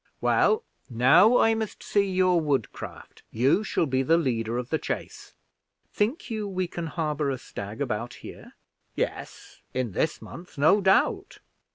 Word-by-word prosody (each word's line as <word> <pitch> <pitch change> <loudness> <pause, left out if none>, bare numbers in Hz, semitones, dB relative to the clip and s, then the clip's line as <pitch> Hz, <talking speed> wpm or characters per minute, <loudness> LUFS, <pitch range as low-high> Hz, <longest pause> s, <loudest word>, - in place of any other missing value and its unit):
Well, 435 +1 +2 0.3
now 130 - +5
I 225 - +4
must 220 -2 -4
see 200 -1 +1
your 185 -2 +3
woodcraft. 140 -7 -4
You 135 - +2
shall 175 - 0
be 130 -2 0
the 160 +5 +3
leader 120 -7 -1
of 125 0 -5
the 160 - +1
chase." - - -6 0.6
"Think 230 +5 -1
you 215 -2 -3
we 185 -1 -2
can 170 -1 -5
harbor 150 -2 -2
a 135 - -2
stag 105 -2 -8
about 120 -2 -3
here?" - - -12 0.4
"Yes, - - -5
in 130 -4 -1
this 155 - -1
month, 175 -1 -12
no 160 +9 +4
doubt." 385 - +2
160 Hz, 155 wpm, -26 LUFS, 130-200 Hz, 0.6 s, now